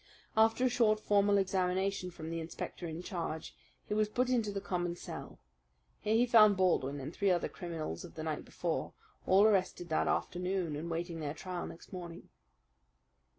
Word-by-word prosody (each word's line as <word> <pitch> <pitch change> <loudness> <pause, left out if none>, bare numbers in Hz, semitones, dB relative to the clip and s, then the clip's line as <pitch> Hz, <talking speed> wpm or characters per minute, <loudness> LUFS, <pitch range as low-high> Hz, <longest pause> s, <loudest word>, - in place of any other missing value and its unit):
After 225 +3 +4
a - - +6
short, 225 -3 +3
formal 205 -1 +3
examination 190 0 0
from 160 -2 -7
the 165 - -2
inspector 165 +1 -5
in 165 +2 -6
charge 165 -4 -4 0.3
he - - -3
was 215 0 +2
put 250 +3 +1
into 225 -5 +1
the 200 - -2
common 175 -2 -2
cell. - - -8 0.6
Here 215 +1 +1
he 235 +2 +5
found 215 -4 +7
Baldwin 145 -7 +2
and 140 +4 -6
three 200 -1 +1
other 175 -2 +2
criminals 160 - -5
of - - -11
the - - -5
night - - -2
before, - - -3 0.3
all 190 +2 +6
arrested 190 -4 +2
that 155 - +1
afternoon 180 -3 -1
and 160 +3 -4
waiting 170 0 -3
their 150 -1 -3
trial 180 +1 -5
next 170 - -12
morning. 170 -2 -8
185 Hz, 175 wpm, -33 LUFS, 165-205 Hz, 0.6 s, found